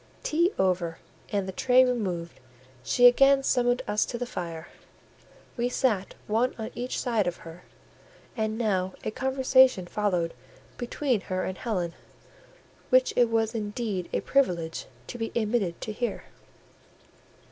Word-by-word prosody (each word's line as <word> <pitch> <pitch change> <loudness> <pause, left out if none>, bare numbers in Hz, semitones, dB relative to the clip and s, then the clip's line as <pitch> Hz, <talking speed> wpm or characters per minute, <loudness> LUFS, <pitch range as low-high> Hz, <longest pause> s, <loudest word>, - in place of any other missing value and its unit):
Tea 340 +4 +2
over 180 -3 0 0.3
and 200 -2 -1
the - - -3
tray 255 +6 +4
removed, 185 - -2 0.4
she 245 - +3
again 275 +2 +6
summoned 245 -1 +2
us 210 0 +2
to 240 - -4
the 245 - -3
fire; 170 -6 -6 0.9
we 245 0 0
sat 220 -7 0
one 230 +4 +1
on 220 -1 -5
each 245 +2 -3
side 225 -6 0
of 175 - -2
her, 165 +2 -10 0.7
and 220 -1 -1
now 190 -5 0
a - - -2
conversation 260 -4 +3
followed 180 -3 -1 0.5
between 245 -2 -1
her 185 -1 -3
and 185 - -4
Helen, 180 -8 -2 1.0
which 255 0 +4
it 240 -2 +4
was 225 0 +1
indeed 210 -4 -3
a - - -1
privilege 175 -12 0 0.2
to 245 - -8
be 225 - -3
admitted 215 -6 0
to 215 - -4
hear. 240 +3 -3
220 Hz, 140 wpm, -27 LUFS, 185-245 Hz, 1.0 s, again